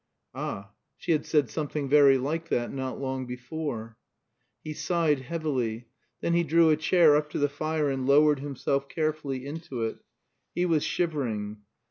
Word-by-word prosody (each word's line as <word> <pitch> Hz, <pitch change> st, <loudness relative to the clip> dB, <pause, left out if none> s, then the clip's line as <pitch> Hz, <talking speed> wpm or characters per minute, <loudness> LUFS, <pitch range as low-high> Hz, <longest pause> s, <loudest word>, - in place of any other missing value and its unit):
Ah, 100 Hz, +1 st, -5 dB, 0.3 s
she -, -, -2 dB
had 155 Hz, -2 st, +1 dB
said 150 Hz, -4 st, +3 dB
something 150 Hz, +1 st, -3 dB
very 140 Hz, -1 st, +6 dB
like 160 Hz, +5 st, -3 dB
that 120 Hz, 0 st, -1 dB
not 130 Hz, -1 st, -4 dB
long 130 Hz, -1 st, -3 dB
before. 125 Hz, -3 st, -5 dB, 0.7 s
He 155 Hz, -, -5 dB
sighed 160 Hz, -3 st, +1 dB
heavily. 130 Hz, -6 st, -3 dB, 0.3 s
Then 170 Hz, -, 0 dB
he 170 Hz, 0 st, +3 dB
drew 165 Hz, +1 st, +4 dB
a -, -, +5 dB
chair 160 Hz, 0 st, +5 dB
up 150 Hz, 0 st, +1 dB
to -, -, -4 dB
the 145 Hz, -, +2 dB
fire 155 Hz, +1 st, -1 dB
and 135 Hz, -2 st, -1 dB
lowered 145 Hz, +1 st, +5 dB
himself 140 Hz, 0 st, -2 dB
carefully 155 Hz, -4 st, -2 dB
into 145 Hz, -5 st, -5 dB
it. 110 Hz, -, -3 dB, 0.6 s
He 175 Hz, -, +1 dB
was 160 Hz, -4 st, +2 dB
shivering. 115 Hz, -11 st, -2 dB
145 Hz, 160 wpm, -27 LUFS, 130-155 Hz, 0.7 s, very